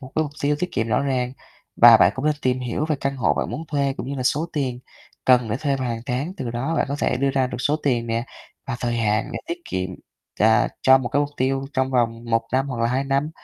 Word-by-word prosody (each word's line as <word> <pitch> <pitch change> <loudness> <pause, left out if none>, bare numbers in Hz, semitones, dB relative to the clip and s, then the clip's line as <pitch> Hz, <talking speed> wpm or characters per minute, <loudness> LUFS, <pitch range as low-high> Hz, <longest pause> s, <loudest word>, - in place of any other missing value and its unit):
một 130 0 -11
cái 155 - +2
mục 145 -2 -5
tiêu 145 +1 +2
tiết 180 +2 -3
kiệm 115 - -1
rõ 110 - +2
ràng. 130 -2 -1 0.4
Và - - +9
bạn - - +5
cũng 130 - -5
nên 150 - +3
tìm 130 0 +1
hiểu 125 +4 -2
về 155 - +1
căn 140 0 -2
hộ 125 - +2
bạn - - -2
muốn 160 - -5
thuê 140 -2 0
cũng - - -5
như 140 - -3
là 130 - -3
số 150 +6 +1
tiền 130 -5 -2 0.4
cần 125 -3 +4
để 110 - 0
thuê 140 0 0
vào 130 -2 -3
hàng 115 -1 -3
tháng, 135 +8 -2
từ 125 -10 -4
đó 125 +7 -2
bạn - - +1
có 140 - -2
thể - - +1
đưa 135 +1 +1
ra 135 -1 +1
được 125 -1 -6
số 150 +3 +1
tiền 120 -4 +1
nè, 115 +1 -1 0.4
và 120 -2 -3
thời 120 -1 -1
hạn 110 -1 0
để 115 - -3
tiết 170 +1 -3
kiệm, 95 0 -3 0.5
à, - - +4
cho 130 0 +7
một 120 -2 -3
cái 145 - +1
mục 145 0 -1
tiêu 135 +1 0
trong 130 -1 0
vòng 115 -2 0
1 115 -1 +1
năm 135 +2 +1
hoặc 125 -3 -4
là - - +3
2 130 +3 0
năm 140 +2 0
130 Hz, 275 wpm, -23 LUFS, 120-140 Hz, 0.5 s, Và